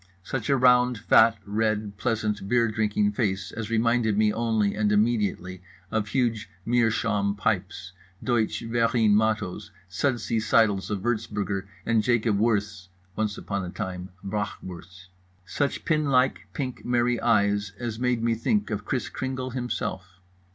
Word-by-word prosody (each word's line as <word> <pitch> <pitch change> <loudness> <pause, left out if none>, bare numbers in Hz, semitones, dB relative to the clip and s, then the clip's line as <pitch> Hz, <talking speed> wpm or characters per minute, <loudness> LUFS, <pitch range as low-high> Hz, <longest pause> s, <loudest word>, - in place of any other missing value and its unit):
Such 120 +4 -4
a 140 - +4
round 125 -1 +4
fat 115 +1 +5
red 105 0 -1
pleasant 105 -4 -2
beer 120 0 +3
drinking 105 -1 +1
face 95 -3 -1
as 115 -1 -5
reminded 115 -1 +2
me 105 0 +3
only 110 -3 +1
and 105 -1 +1
immediately 105 -4 0 0.3
of 110 -1 0
huge 115 -3 -1 0.2
meerschaum 115 -4 +1
pipes, 95 -3 -2 0.3
Deutsche 120 -3 0
Verein 115 -2 +2
mottos, 105 -4 0 0.2
sudsy 115 +3 -1
seidels 110 -3 +2
of 100 -3 -2
Wurtzburger, 105 -4 -2 0.2
and 115 -1 +3
Jacob 110 -2 +1
Wirth's 105 -4 0 0.3
(once 105 -1 -1
upon 100 -1 -3
a 90 - -5
time) 90 -2 -5
brachwurst. 95 -2 -6 0.4
Such 140 +10 -2
pin 155 -3 +1
like 130 -2 +2
pink 130 -3 -5
merry 120 -1 +1
eyes 100 -3 +2
as 115 -2 -4
made 125 -2 0
me 115 0 +2
think 205 - 0
of 105 -1 -2
Kris 125 0 -2
Kringle 130 -1 -4
himself. 95 -7 -4
110 Hz, 140 wpm, -26 LUFS, 100-120 Hz, 0.4 s, fat